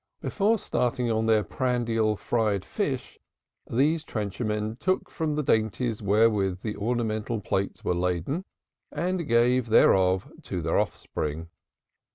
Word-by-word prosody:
Before 215 +3 +1
starting 125 - -1
on 110 0 +1
their 110 -2 +4
prandial 115 -1 0
fried 105 -3 0
fish, - - -3 0.5
these 150 +7 +2
trencher 105 - -4
men 105 +1 -2
took 185 +7 -1
from 155 -3 -1
the 150 - 0
dainties 110 -1 0
wherewith 100 -2 +2
the 105 -2 -3
ornamental 110 0 -1
plates 95 0 -2
were - - +2
laden 90 - -1 0.5
and 180 -1 -2
gave 120 +1 +3
thereof 95 0 +4
to 90 - -4
their 80 - +2
offspring. 80 +2 -3
110 Hz, 130 wpm, -27 LUFS, 100-125 Hz, 0.5 s, their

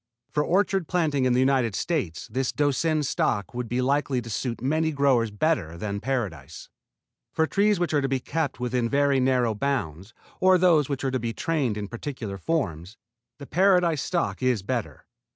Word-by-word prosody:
For 150 +1 +1
orchard 190 0 +1
planting 150 -7 +1
in 125 - +3
the 125 - +2
United 130 -5 +2
States 135 - -2
this 130 +2 -1
Doucin 150 +2 +1
stock 105 -6 -1
would 120 -1 -4
be 125 +1 0
likely 140 -1 +1
to 115 - -8
suit 120 +2 -3
many 155 +5 0
growers 135 -6 +2
better 105 - -1
than 100 +2 -3
Paradise. 95 - -4 0.6
For 160 - +1
trees 205 +3 +2
which 175 -2 -1
are 145 - +3
to 135 - -1
be 135 -1 0
kept 145 0 -3
within 125 -1 -1
very 140 0 +2
narrow 125 -3 +2
bounds, 105 - -3 0.2
or 185 0 +5
those 170 -6 +3
which 140 -2 -3
are 135 - 0
to 130 - -1
be 115 0 -3
trained 140 -10 -1
in 105 -1 -4
particular 115 -3 -6
forms, 95 - -2 0.4
the 140 - -9
Paradise 180 -2 +3
stock 175 -5 -2
is 125 -6 +1
better. 120 0 -4
130 Hz, 180 wpm, -25 LUFS, 115-155 Hz, 0.6 s, or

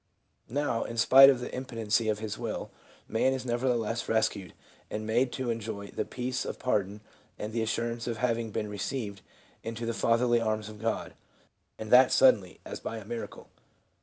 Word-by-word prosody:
Now, 135 -3 0
in 115 - -6
spite 135 +4 +9
of 130 -3 +2
the - - -6
impotency 115 -4 -1
of 105 - +1
his 110 -1 -4
will, - - -5 0.4
man 120 +4 +2
is 130 -1 -4
never 120 +1 -1
theless 115 -1 -1
rescued 105 -5 0 0.3
and 110 0 -4
made 120 +3 +1
to 130 -3 -2
enjoy 110 -3 -5
the - - -2
peace 125 +1 -3
of - - -5
pardon 105 -4 -1 0.4
and 105 +1 -5
the 115 - 0
assurance 115 +1 -2
of 115 -2 -2
having 115 -1 0
been 105 0 -3
received 105 0 -4 0.4
into 115 +1 -5
the 115 - -1
Fatherly 120 +1 +2
arms 110 -1 -1
of 105 0 -11
God, 115 -1 -2 0.6
and 110 -1 -7
that 125 +1 +7
suddenly, 105 -9 +4
as - - -6
by 115 - -5
a 110 - -9
miracle. 115 +2 -7
115 Hz, 180 wpm, -29 LUFS, 110-125 Hz, 0.6 s, spite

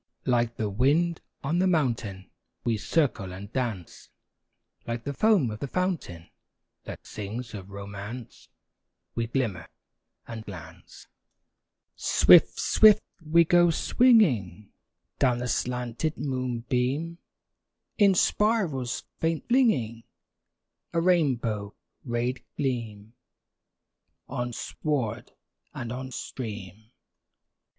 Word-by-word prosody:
Like 120 -2 +1
the 110 - -2
wind 145 - +2 0.2
on 155 +5 0
the 190 - +3
mountain, 115 - -1 0.3
We 120 -2 +1
circle 115 - 0
and 100 +4 -9
dance; 115 -9 -4 0.8
Like 115 0 -3
the 140 - -3
foam 190 - +3
of 105 - -7
the 140 - -3
fountain, 165 - -3 0.5
That - - -8
sings 115 +3 -6
of 100 -2 -8
romance, 100 +4 -8 0.6
We 115 -1 -2
glimmer 115 -9 -2 0.6
and 115 -1 -7
glance. 95 -6 -11 0.9
Swift, - - +5
swift 215 -1 +6 0.2
we 165 +2 +5
go 175 +1 +5
swinging 140 - +3 0.5
Down 125 -2 +3
the 125 0 -3
slanted 125 +5 -2
moonbeam, 130 +4 -2 0.8
In 200 -2 +6
spirals 175 - +1 0.2
faint 165 -1 -1
flinging 130 - +2 0.9
A 165 - +2
rainbow 125 - +1 0.3
rayed 120 +1 -2
gleam 115 -5 -3 1.1
On 120 -2 -3
sward 120 -3 -3 0.4
and 120 -1 -5
on 130 +1 -5
stream. 110 -5 -7
125 Hz, 100 wpm, -27 LUFS, 110-155 Hz, 1.1 s, swift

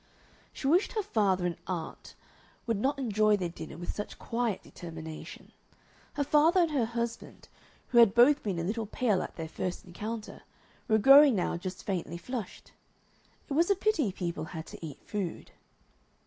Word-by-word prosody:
She - - -8
wished 340 +8 +3
her 430 -3 -1
father 195 - +1
and 175 -1 -2
aunt 175 -4 -6 0.5
would 230 -3 0
not 275 +6 0
enjoy 215 -5 +2
their 180 -3 -2
dinner 160 -2 -9
with 175 - -5
such 210 - -6
quiet 230 -4 -2
determination. 160 -2 -9 0.6
Her 290 - 0
father 310 +5 +4
and 335 -2 +1
her 265 -6 +1
husband, 235 0 -5 0.4
who 240 - +5
had 230 -3 +6
both 275 +5 +6
been 195 -5 -2
a 165 - -2
little 220 +4 -2
pale 215 -4 +1
at - - -7
their 160 -1 -5
first 180 +3 -4
encounter, 215 +5 -6 0.5
were 220 - +4
growing 275 +3 +8
now 180 -2 0
just 185 +2 -6
faintly 175 -3 -3
flushed. 230 +4 -7 0.8
It - - -4
was 335 +5 +3
a 400 - +4
pity 350 - +1
people 170 -4 -4
had 160 0 -7
to - - -11
eat 150 -4 -8
food. 195 -5 -4
215 Hz, 170 wpm, -30 LUFS, 175-260 Hz, 0.8 s, growing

